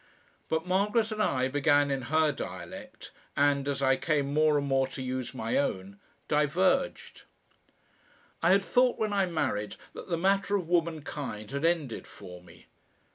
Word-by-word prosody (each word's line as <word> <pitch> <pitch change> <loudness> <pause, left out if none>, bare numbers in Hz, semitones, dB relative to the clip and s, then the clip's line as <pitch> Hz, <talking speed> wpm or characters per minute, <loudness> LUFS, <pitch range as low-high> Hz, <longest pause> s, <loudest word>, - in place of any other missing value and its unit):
But 160 +1 0
Margaret 210 +4 +1
and 215 0 -2
I 130 -9 +1
began 145 +1 +2
in 135 -1 -1
her 155 -1 +3
dialect, - - -8 0.3
and, 140 -1 +2
as 140 -1 -1
I 135 0 +4
came 145 -3 0
more 155 0 +4
and 140 - -1
more 135 -1 +2
to 135 - -9
use 130 0 -4
my 115 -2 -1
own, 100 -7 -3 0.3
diverged. 175 - 0 1.2
I 170 - +3
had 195 +1 +5
thought 250 0 +3
when 215 -1 -1
I 195 -2 +2
married 105 -11 -2 0.2
that - - -9
the 170 - 0
matter 195 +3 +2
of 185 -5 -2
womankind 150 -10 -2
had 140 +3 -2
ended 160 -8 -1
for 90 0 -11
me. 85 -2 -17
150 Hz, 160 wpm, -29 LUFS, 135-180 Hz, 1.2 s, had